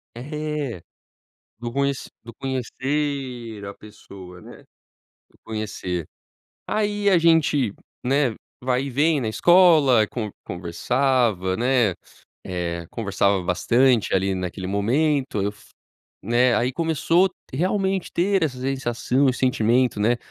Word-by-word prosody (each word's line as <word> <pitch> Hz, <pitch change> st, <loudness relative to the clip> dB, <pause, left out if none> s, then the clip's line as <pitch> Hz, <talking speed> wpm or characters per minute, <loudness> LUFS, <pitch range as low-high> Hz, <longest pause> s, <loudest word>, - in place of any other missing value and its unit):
É. 150 Hz, -, -4 dB, 0.8 s
Do 120 Hz, 0 st, -5 dB
conhe 140 Hz, +2 st, +1 dB, 0.3 s
do 115 Hz, -1 st, -11 dB
conhecer 130 Hz, -3 st, -3 dB
a 100 Hz, -, -6 dB
pessoa, 95 Hz, -4 st, -13 dB
né, -, -, -12 dB
de -, -, -25 dB, 0.6 s
conhecer. 105 Hz, -6 st, -4 dB, 0.6 s
Aí 205 Hz, -1 st, 0 dB
a 185 Hz, -, +5 dB
gente, 155 Hz, -9 st, +3 dB, 0.3 s
né, 135 Hz, -2 st, +2 dB, 0.3 s
vai 130 Hz, +1 st, 0 dB
e 140 Hz, -, -4 dB
vem 145 Hz, +3 st, +2 dB
na 110 Hz, -, -2 dB
escola, 155 Hz, -, +5 dB
conve 110 Hz, -4 st, -5 dB
conversava, 105 Hz, +2 st, 0 dB
né, 120 Hz, -5 st, +2 dB, 0.5 s
eh, 85 Hz, -2 st, -3 dB
conversava 100 Hz, -3 st, 0 dB
bastante 115 Hz, +7 st, +2 dB
ali 95 Hz, 0 st, +1 dB
naquele 90 Hz, +1 st, -4 dB
momento, 125 Hz, +4 st, 0 dB
eu 100 Hz, +1 st, -1 dB, 0.7 s
né, 120 Hz, +3 st, +3 dB
aí 125 Hz, +2 st, 0 dB
começou 165 Hz, +4 st, +2 dB, 0.2 s
realmente 190 Hz, +4 st, 0 dB
ter 190 Hz, +2 st, +1 dB
essa 130 Hz, -5 st, -3 dB
sensação 130 Hz, 0 st, 0 dB
e 125 Hz, -, +1 dB
sentimento, 125 Hz, -2 st, +1 dB
né: 120 Hz, +3 st, +3 dB
125 Hz, 115 wpm, -23 LUFS, 105-145 Hz, 0.8 s, a